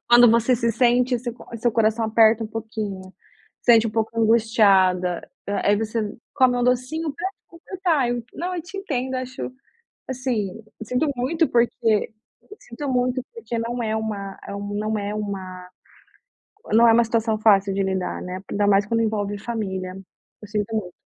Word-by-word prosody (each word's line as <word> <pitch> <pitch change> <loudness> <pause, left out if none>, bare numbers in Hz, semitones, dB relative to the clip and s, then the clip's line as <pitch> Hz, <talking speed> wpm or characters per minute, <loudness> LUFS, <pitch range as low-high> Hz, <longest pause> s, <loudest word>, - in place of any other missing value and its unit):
Quando 240 -1 +8
você 235 +2 +3
se 235 -1 0
sente 245 +2 +3
seu 240 0 -5
cor 240 - -15
seu 235 +1 +1
coração 225 0 +2
aperta 220 0 +4
um - - -4
pouquinho, 215 -4 -6 0.5
sente 230 -2 +5
um - - -2
pouco 225 +1 -2
angustiada. 200 -6 +3 0.4
Aí 205 - +4
você 225 +2 -2 0.3
come 255 -3 +4
um 245 - +1
docinho 255 +6 0
pra 345 +6 -3
te 390 - -17
completar. 335 -5 -1
Eu 240 -1 -3
não, 360 +3 -3
eu 345 - -4
te 350 +4 -10
entendo, 265 -8 -3
acho, 255 0 -5 0.6
assim, 230 -6 -3 0.2
sinto 250 +7 0
muito 310 +7 +1
porque 235 -2 +1 0.5
sinto 245 +5 -7
muito 250 0 +1
porque 455 - -5
não 235 +1 -3
é 220 -1 -1
uma 205 -3 -4 0.4
não 215 +1 -1
é 205 +1 -3
uma 190 -3 -6 1.0
não 230 +2 +6
é - - +7
uma 235 +1 +5
situação 225 -1 0
fácil 200 -2 +4
de 195 - 0
lidar, 190 -1 -2
né, 180 +1 -6
ainda 205 0 +1
mais 200 0 +4
quando 230 +1 0
envolve 205 -2 -1
família. 190 -5 -4 0.5
Eu 210 - -10
sinto 210 +1 -2
muito. 190 -5 -3
225 Hz, 165 wpm, -23 LUFS, 205-245 Hz, 1.0 s, Quando